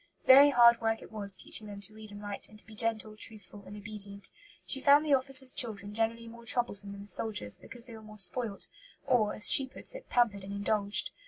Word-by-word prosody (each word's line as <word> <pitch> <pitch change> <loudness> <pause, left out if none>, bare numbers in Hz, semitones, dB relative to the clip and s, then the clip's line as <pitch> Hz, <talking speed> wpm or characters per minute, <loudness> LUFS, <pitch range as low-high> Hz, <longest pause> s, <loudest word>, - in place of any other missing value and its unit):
Very 275 +2 +7
hard 235 -3 +4
work 225 0 -2
it - - -15
was 200 -3 +5
teaching 215 +3 -2
them 200 -1 -10
to 210 +2 -9
read 215 0 -13
and 205 0 -12
write 205 -1 -6
and 215 - -17
to - - -11
be 225 - -16
gentle, 215 -1 -1
truthful, 210 -2 -6
and 205 - -11
obedient. 200 -1 -5 0.3
She 270 - 0
found 285 +2 +4
the 295 - +1
officers' 265 -1 +1
children 205 -4 -4
generally 225 +1 -3
more 235 +1 -13
troublesome 220 -4 +1
than 200 - -11
the - - -16
soldiers', 185 - 0
because 240 -2 -11
they 235 - -13
were 220 - -12
more 215 0 -14
spoilt, 210 +1 -2 0.4
or, 215 -4 0
as 210 - +7
she 270 - +6
puts - - -6
it, - - -12
pampered 220 -5 0
and 200 +1 -9
indulged. 205 0 -2
215 Hz, 225 wpm, -29 LUFS, 205-235 Hz, 0.4 s, Very